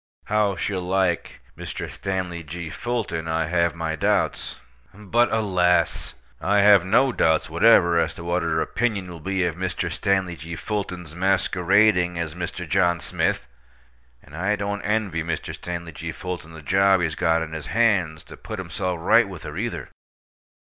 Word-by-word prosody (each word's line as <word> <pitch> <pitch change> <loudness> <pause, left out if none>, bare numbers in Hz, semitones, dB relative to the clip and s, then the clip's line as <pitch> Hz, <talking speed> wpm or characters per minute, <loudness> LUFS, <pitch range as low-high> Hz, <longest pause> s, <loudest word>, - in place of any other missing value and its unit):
How 105 -1 +1
she'll 95 +2 -2
like 90 -1 -1
Mr. - - -6
Stanley 95 -3 -4
G. 80 +1 -7
Fulton 110 -9 -3
I 80 0 0
have 85 0 +1
my 80 -1 -2
doubts; 75 - 0 0.4
but, 110 +4 +1
alas! 90 -5 +1 0.2
I 105 0 +2
have 100 -3 +7
no 130 +8 +3
doubts 80 -7 +1
whatever 85 -1 +5
as - - 0
to 85 - -9
what 85 +1 0
her 80 -1 0
opinion 105 -6 -1
will 85 - -9
be 95 +2 -1
of 85 -3 -2
Mr. 90 -1 -3
Stanley 95 -3 0
G. 85 +1 -7
Fulton's 90 -5 -4
masquerading 90 0 +2
as 85 -3 -3
Mr. 90 +1 -5
John 85 0 +2
Smith! 65 - -1 0.8
And 70 - -14
I 95 +5 0
don't 100 0 -3
envy 105 -6 -1
Mr. 85 0 -4
Stanley 85 -1 -6
G. 85 +2 -6
Fulton 85 0 -6
the 80 -1 -11
job 95 +3 +4
he's 80 -3 0
got 80 +1 +1
on 80 0 -8
his 80 -3 -6
hands 95 -9 +1
to - - -12
put 110 - -7
himself 90 0 -3
right 100 +5 +4
with 90 -4 -9
her, 75 - -7
either. 115 +6 -4
90 Hz, 165 wpm, -23 LUFS, 85-100 Hz, 0.8 s, have